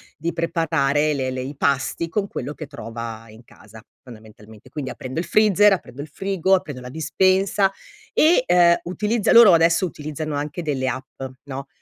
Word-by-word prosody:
di 165 Hz, +2 st, -3 dB
preparare 155 Hz, -3 st, 0 dB
le 130 Hz, -2 st, -2 dB
le 130 Hz, 0 st, -4 dB
i 135 Hz, +3 st, -6 dB
pasti 140 Hz, +4 st, -1 dB
con 200 Hz, +4 st, -2 dB
quello 145 Hz, -, -6 dB
che 155 Hz, 0 st, -9 dB
trova 115 Hz, -4 st, -8 dB
in 110 Hz, +2 st, -15 dB
casa, 110 Hz, -1 st, -16 dB, 0.2 s
fondamentalmente. 110 Hz, -2 st, -15 dB
Quindi 135 Hz, -1 st, -5 dB
aprendo 130 Hz, +4 st, -6 dB
il 175 Hz, -, -3 dB
freezer, 210 Hz, -1 st, +4 dB
aprendo 140 Hz, -7 st, -6 dB
il 150 Hz, -, -8 dB
frigo, 190 Hz, +2 st, -1 dB
aprendo 145 Hz, -8 st, -1 dB
la 125 Hz, -, -9 dB
dispensa 190 Hz, +6 st, +1 dB, 0.4 s
e, 315 Hz, -3 st, +4 dB
uhm, 175 Hz, -1 st, +5 dB, 0.2 s
utilizza 210 Hz, +3 st, 0 dB
loro 230 Hz, -5 st, +8 dB
adesso 165 Hz, +2 st, +3 dB
utilizzano 155 Hz, 0 st, -6 dB
anche 150 Hz, +4 st, -4 dB
delle 135 Hz, -4 st, -2 dB
app, 130 Hz, +1 st, -6 dB, 0.2 s
no, 135 Hz, -1 st, -7 dB
150 Hz, 170 wpm, -22 LUFS, 130-180 Hz, 0.4 s, loro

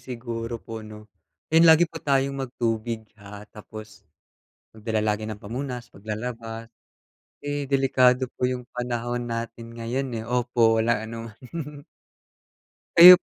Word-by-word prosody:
siguro 120 Hz, -2 st, -4 dB
po 115 Hz, 0 st, -7 dB
'no? 105 Hz, 0 st, -10 dB, 0.5 s
Then 165 Hz, +1 st, +7 dB
lagi 160 Hz, +1 st, +8 dB
po 165 Hz, -1 st, -8 dB
tayong 140 Hz, -1 st, +2 dB
mag 135 Hz, -2 st, -3 dB
tubig, 115 Hz, -1 st, -1 dB, 0.2 s
ha, 100 Hz, +1 st, -10 dB
tapos 110 Hz, 0 st, -10 dB, 0.7 s
magdala 110 Hz, 0 st, -2 dB
lagi 110 Hz, 0 st, 0 dB
ng 110 Hz, -1 st, -6 dB
pamunas 125 Hz, +2 st, -5 dB
'pag 100 Hz, +2 st, -17 dB
lalabas. 115 Hz, +1 st, -5 dB, 0.7 s
Eh, 145 Hz, -1 st, -2 dB
delikado 130 Hz, -2 st, +4 dB
po 125 Hz, -, +3 dB
yung 125 Hz, -1 st, -3 dB
panahon 120 Hz, 0 st, -2 dB
natin 115 Hz, 0 st, -5 dB
ngayon, 120 Hz, +4 st, -2 dB
eh, 110 Hz, -, -4 dB
opo 120 Hz, -2 st, +3 dB
walang 115 Hz, -1 st, +2 dB
anuman. 125 Hz, +7 st, -7 dB, 1.1 s
Kayo 180 Hz, +2 st, +13 dB
p -, -, -55 dB
120 Hz, 135 wpm, -25 LUFS, 110-130 Hz, 1.1 s, Kayo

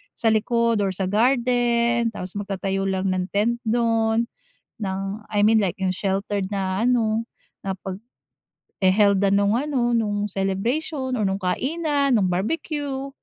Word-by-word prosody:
sa 225 Hz, -, +2 dB
likod 230 Hz, +1 st, +2 dB
or 195 Hz, -2 st, 0 dB
sa 190 Hz, -, -2 dB
garden. 235 Hz, 0 st, +2 dB
Tapos 185 Hz, -2 st, -6 dB
magtatayo 195 Hz, -1 st, -2 dB
lang 190 Hz, 0 st, 0 dB
ng 185 Hz, -1 st, -1 dB
tent 215 Hz, +5 st, 0 dB
do'n 225 Hz, 0 st, +2 dB, 0.6 s
ng 190 Hz, -2 st, -2 dB, 0.3 s
I 205 Hz, -1 st, +2 dB
mean 220 Hz, 0 st, +5 dB
like 185 Hz, -4 st, -1 dB
yung 190 Hz, -1 st, 0 dB
sheltered 195 Hz, +1 st, -2 dB
na 195 Hz, +1 st, -1 dB
ano 230 Hz, -2 st, +2 dB, 0.4 s
na 195 Hz, -, -2 dB, 0.9 s
paghe-held-an 200 Hz, 0 st, +2 dB
nung 200 Hz, +2 st, +3 dB
ano 255 Hz, -4 st, 0 dB
nung 205 Hz, -2 st, -1 dB
celebration 250 Hz, -, -1 dB
or 215 Hz, -, 0 dB
nung 195 Hz, +1 st, -1 dB
kainan, 280 Hz, -, 0 dB
nung 200 Hz, -5 st, +3 dB
barbecue. 275 Hz, -, -2 dB
215 Hz, 135 wpm, -23 LUFS, 195-240 Hz, 0.9 s, mean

